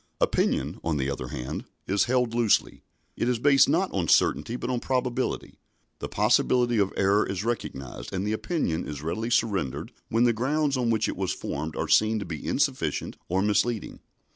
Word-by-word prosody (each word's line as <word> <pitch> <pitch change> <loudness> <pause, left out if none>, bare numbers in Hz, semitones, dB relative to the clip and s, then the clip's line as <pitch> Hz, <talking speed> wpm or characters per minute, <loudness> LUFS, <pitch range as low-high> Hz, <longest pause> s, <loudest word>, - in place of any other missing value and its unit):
Opinion, - - 0
on 80 -2 0
the 70 0 -1
other 65 -2 -4
hand, 60 +1 -5 0.2
is 100 0 +2
held 125 -1 +1
loosely. 115 -3 +2 0.3
It 120 - 0
is 125 - +1
based 140 +3 +5
not 175 +6 +1
on 90 -4 -1
certainty 115 - +3
but 125 - -3
on 125 - 0
probability. 125 0 -2 0.4
The - - -5
possibility 120 +2 +2
of 100 -1 +2
error 100 +2 +3
is 95 0 -3
recognised, 70 - -4
and 95 0 -2
the 105 - 0
opinion 110 - -1
is 75 -1 -6
readily 110 +9 -2
surrendered 100 - 0 0.2
when 115 +2 +2
the 120 -1 +4
grounds 140 +5 0
on 125 -2 0
which 110 -1 +1
it - - -3
was 95 -1 -1
formed 80 0 -4
are - - -2
seen 110 +1 +4
to 100 - -4
be 80 -4 -6
insufficient - - -1
or 95 +2 +1
misleading. 105 +2 0
110 Hz, 185 wpm, -26 LUFS, 95-125 Hz, 0.4 s, based